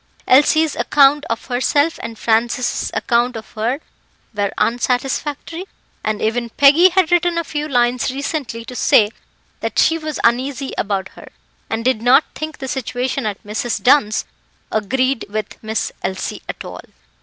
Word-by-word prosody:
Elsie's 300 +3 +4
account 285 0 +4
of 230 - -3
herself, 285 +5 +1
and 225 - -7
Francis's 235 +3 0
accounts 240 0 +1
of 220 - -10
her, 235 +7 -2 0.5
were 205 -1 -1
unsatisfactory, 270 +8 -1 0.4
and 215 -1 -2
even 235 +2 0
Peggy 290 +9 +6
had 365 -2 +2
written 350 -1 +2
a 335 - 0
few 300 -1 -4
lines 245 -2 +1
recently 270 -4 -4
to 250 - -9
say 210 -2 +4 0.5
that - - -4
she 330 0 +4
was 310 -1 -5
uneasy 260 +3 0
about 195 -2 -2
her, - - -14 0.4
and 225 +1 -3
did 255 -4 +2
not 250 +5 +5
think 310 0 -6
the 265 - -6
situation 255 -1 -2
at 205 -2 -5
Mrs. 220 +3 -2
Dunn's 245 -5 +3 0.5
agreed 255 +5 0
with 215 +1 -5
Miss 220 0 -2
Elsie 190 0 -4
at - - -6
all. - - -8
250 Hz, 150 wpm, -19 LUFS, 225-290 Hz, 0.5 s, Peggy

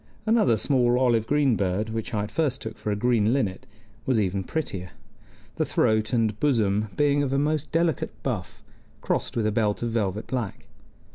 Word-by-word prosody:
Another 215 - +3
small 125 0 +2
olive 120 -4 +2
green 145 -4 +3
bird, 100 +3 -1
which 115 -1 -4
I 105 -2 -1
at 105 - -6
first 140 -5 0
took 110 - -6
for - - -5
a 105 - +1
green 115 0 +2
linnet, 100 -9 -1 0.4
was 130 -4 +3
even 95 -1 0
prettier, 95 - -4 0.7
the - - +2
throat 110 0 +1
and 110 -4 +1
bosom 110 -7 +2
being 145 -1 +3
of 140 -2 -1
a 135 - +1
most 150 +1 0
delicate 165 -3 +1
buff, - - -4 0.4
crossed - - -2
with 115 - +1
a 110 - +2
belt 105 0 0
of 120 - -1
velvet 105 -2 -1
black. 120 -6 -4
115 Hz, 185 wpm, -25 LUFS, 105-135 Hz, 0.7 s, Another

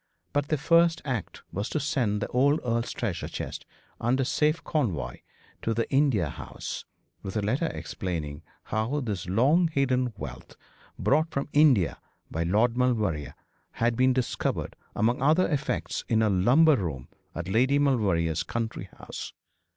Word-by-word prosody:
But 145 0 +1
their 155 - +1
first 165 +3 +3
act 125 -7 -4
was 100 +6 -3
to 155 - -1
send 125 -7 0
the - - -2
old 140 +4 +3
earl's 115 -1 0
treasure - - -3
chest - - -6 0.3
under 130 +3 +1
safe 155 +4 +1
convoy 115 - -1 0.4
to 115 - -1
the 115 - 0
India 135 - +3
House, - - -7 0.4
with 95 +2 -4
a - - +1
letter 130 +11 +1
explaining 80 - -4 0.2
how 115 +7 -1
this 100 -8 -4
long 140 - +4
hidden 130 -5 +1
wealth, 65 -3 -8 0.4
brought 155 +4 +2
from 140 -3 -3
India 130 - +4 0.3
by 80 - -2
Lord 105 +8 +2
Maulevrier, 110 - 0 0.4
had 115 0 +1
been 130 +2 +4
discovered 125 -1 -1 0.2
among 120 +4 +1
other 155 +6 +4
effects 145 -3 -2
in 110 -1 +3
a 105 - +3
lumber 130 - +5
room 70 - -4 0.3
at 85 +2 -4
Lady 125 +8 +3
Maulevrier's 100 - +2
country 110 -5 -4
house. - - -7
120 Hz, 150 wpm, -27 LUFS, 100-140 Hz, 0.4 s, lumber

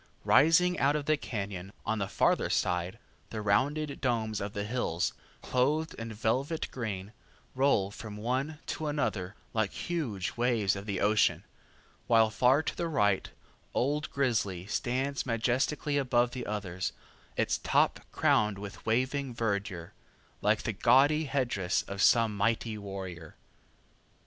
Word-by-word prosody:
Rising 180 +4 +5
out 140 +2 +3
of 150 -2 -2
the 155 +1 +3
cañon, 100 -8 -5 0.2
on 110 0 0
the 100 - -1
farther - - +2
side, 90 +1 0 0.3
the 110 - -5
rounded 140 +9 0
domes 110 -4 0
of 100 +1 -4
the 100 - -2
hills, 105 -6 -1 0.3
clothed 150 +6 +1
in 115 0 -6
velvet 130 +9 -1
green, 105 -4 -5 0.4
roll 130 -7 +2
from 105 0 -8
one 130 +7 -2
to 155 - -3
another 105 -10 -2 0.2
like 110 -3 +1
huge 125 - -3
waves 115 -5 +2
of 100 +2 -7
the 100 -3 -2
ocean, 105 +1 +3 0.6
while 115 -2 +5
far 130 +7 +4
to - - -3
the 170 - -2
right 105 - +1 0.5
old 145 +4 0
Grizzly 110 -10 0
stands 130 +6 -1
majestically 130 +5 0
above 120 -2 +2
the 125 -2 -5
others, 95 -4 -3 0.4
its - - +1
top - - +2
crowned 105 -2 +2
with 100 0 -8
waving 130 +3 0
verdure, 100 -6 -2 0.5
like - - +2
the - - -1
gaudy 150 +4 +4
headdress 120 -10 0
of 100 0 -5
some 115 -1 +4
mighty 110 +2 0
warrior. 95 -5 -7
115 Hz, 140 wpm, -30 LUFS, 100-135 Hz, 0.6 s, Rising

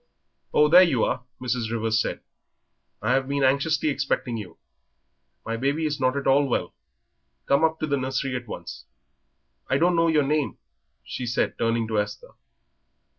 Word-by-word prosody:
"Oh, 150 - +5
here 180 +2 +9
you 150 -11 +3
are," 125 - -1 0.2
Mrs. 120 -3 -2
Rivers 115 -1 +1
said. - - -4 0.8
"I 110 - +1
have 135 0 +1
been 140 0 -1
anxiously 140 +4 +2
expecting 130 -3 -1
you; 105 -5 -8 0.9
my 115 +1 -2
baby 140 +6 0
is 150 -2 -2
not 130 +1 +1
at 140 - -3
all 140 +1 +4
well. 125 - -2 0.7
Come 140 +3 +2
up 160 0 +2
to - - +1
the 140 -2 0
nursery 135 0 -2
at 125 -1 -5
once. - - -8 0.8
I 135 - +3
don't 175 +3 +3
know 165 0 +3
your 155 -3 +3
name," 150 0 -1 0.5
she 125 - -5
said, 120 - 0
turning 115 0 0
to 110 -1 0
Esther. 105 0 -5
135 Hz, 170 wpm, -25 LUFS, 115-150 Hz, 0.9 s, here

